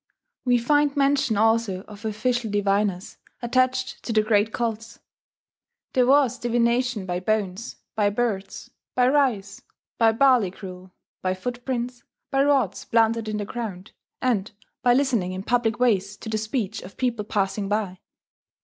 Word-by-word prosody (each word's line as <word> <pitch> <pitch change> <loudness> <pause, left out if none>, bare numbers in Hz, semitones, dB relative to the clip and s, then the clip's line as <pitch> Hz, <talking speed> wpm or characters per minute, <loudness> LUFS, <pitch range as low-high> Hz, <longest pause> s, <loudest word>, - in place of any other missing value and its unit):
We 245 -1 +4
find 290 +4 +2
mention 275 -5 +2
also 225 -3 +2
of 210 +2 -12
official 225 +2 -1
diviners, 200 -2 0 0.2
attached 255 +1 0
to - - -5
the 215 -1 +3
great 215 0 +2
cults. 225 -1 -3 1.0
There 250 -1 +3
was 265 -3 +4
divination 240 -2 +1
by 180 -1 -2
bones, 205 +2 -2 0.2
by 210 -1 +2
birds, 205 -3 -3 0.2
by 250 0 +4
rice, 250 -9 +1 0.4
by 225 -1 +5
barley 250 -5 +4
gruel, 185 0 -10 0.3
by 185 0 0
footprints, 245 +3 -4 0.3
by 270 0 +3
rods 270 -9 +1
planted 230 -1 +2
in 215 - -2
the 205 - -3
ground, 205 -4 -6 0.3
and 225 -6 +1 0.3
by 245 -1 +4
listening 240 -10 +1
in 185 +1 -5
public 235 0 +1
ways 205 -5 +1
to - - -8
the 220 - 0
speech 220 -1 -3
of 185 - -12
people 240 -4 -1
passing 200 -1 -1
by. 205 -3 -1
225 Hz, 145 wpm, -24 LUFS, 205-250 Hz, 1.0 s, by